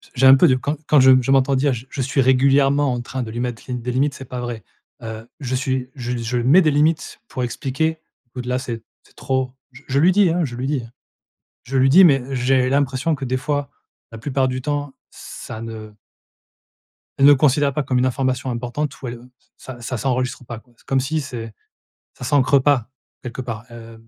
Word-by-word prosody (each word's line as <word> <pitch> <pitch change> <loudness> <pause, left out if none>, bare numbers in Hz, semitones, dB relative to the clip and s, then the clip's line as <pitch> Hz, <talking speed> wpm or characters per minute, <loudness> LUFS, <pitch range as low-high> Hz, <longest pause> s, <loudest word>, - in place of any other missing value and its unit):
j'ai 135 +1 +3
un 130 +1 +10
peu 165 +5 +5
de 130 - +4
quand 145 +4 -2
quand 150 -3 +5
je 130 0 +7 0.2
m'entends 135 0 +3
dire 135 0 +2
j 120 +2 -7
je 135 - -4
suis 135 +2 +1
régulièrement 135 +1 +3
en 120 - -3
train 125 +1 -5
de 110 - -7
lui 120 +1 -4
mettre 120 -3 -4
les 125 - -4
des 125 0 -3
limites 140 +3 +1
c'est 135 - -9
pas 125 0 -6
vrai. 120 -2 -5 0.4
Heu, 110 0 -7
je 130 -1 -3
suis 130 -1 -2
je 125 -2 -4
je 120 +1 -2
mets 135 +10 +5
des 155 - +3
limites 150 +2 0
pour 130 - -4
expliquer 150 +6 -2 0.4
au-delà 125 0 -2
c'est 120 -3 -5 0.2
c'est - - -25
trop. 130 -1 -1 0.2
J 135 - -14
je 135 +1 +2
lui 175 +4 +5
dis, 200 -2 +4
hein, 170 0 +1
je 120 -3 -6
lui 130 +2 -3
dis. 140 -4 -1 0.8
Je 135 +2 -3
lui 130 0 +4
dis 180 +8 +8
mais 135 -6 +5
j'ai 130 0 +2
l'impression 140 +3 +1
que 135 -2 -5
des 130 +1 -1
fois, 145 +1 -2 0.4
la 115 - -8
plupart 130 +1 0
du 130 0 -3
temps, 145 -1 -3 0.2
ça 110 - -9
ne 110 -2 -8 1.3
elle 135 - +3
ne 145 - +9
considère 145 0 +3
pas 150 - -1
comme 130 -2 0
une 130 - +2
information 130 0 -1
importante 125 +4 -4
ou 130 - -5
elle, 120 - -5
heu, 125 +1 -14 0.3
ça 125 -2 -10
ça 125 +2 -4
s'enregistre 125 0 -2
pas 120 -1 -7
quoi. 120 +1 -22
C'est - - -27
comme 135 -1 +1
si 155 +4 -1
c'est 115 -6 -7 0.6
ça - - -9
s'ancre 140 0 +3
pas 130 -6 +2 0.3
quelque 125 +1 -6
part, 115 -1 -6
heu, 115 -1 -11
130 Hz, 215 wpm, -21 LUFS, 125-140 Hz, 1.3 s, un